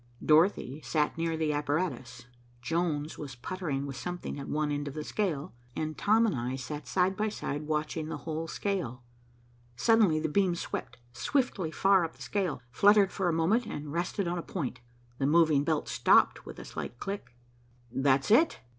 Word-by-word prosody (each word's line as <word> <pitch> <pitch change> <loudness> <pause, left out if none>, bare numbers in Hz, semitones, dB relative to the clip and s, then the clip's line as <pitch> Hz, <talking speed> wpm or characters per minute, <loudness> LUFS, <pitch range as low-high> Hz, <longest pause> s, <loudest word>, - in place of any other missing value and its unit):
Dorothy 155 -3 +3
sat 150 -1 0
near 165 0 -1
the 155 -1 0
apparatus. 145 -5 -2 0.3
Jones 155 +2 -1
was 140 -4 -6
puttering 145 0 -3
with 135 -1 -6
something 175 -3 -5
at 140 - -6
one 150 0 0
end 145 0 -2
of 140 - -6
the 155 - -3
scale, 160 -7 -2 0.2
and 155 0 -3
Tom 220 +3 +3
and 220 - +1
I 125 +1 -2
sat 145 +3 -6
side 185 +1 +2
by 215 +2 0
side, 150 -7 -4
watching 155 +1 -2
the - - -3
whole 160 0 -4
scale. 160 - -3 0.7
Suddenly 205 - +4
the 160 - -1
beam 180 +2 +2
swept - - -5 0.2
swiftly 240 - 0
far 190 +2 +4
up 165 - -4
the - - -18
scale, 190 -10 -2
fluttered 200 - +5
for 190 -3 0
a - - +1
moment 200 +9 +2
and 150 -6 -6
rested 175 +3 -1
on 175 0 -1
a - - -2
point. 135 -9 -4 0.4
The 135 - +2
moving 155 -2 +4
belt 155 0 0
stopped - - +3
with - - -8
a - - -9
slight 120 - -6
click. 130 -9 -6 0.6
"That's 135 - +2
it. 310 +9 +5
160 Hz, 180 wpm, -30 LUFS, 145-185 Hz, 0.7 s, fluttered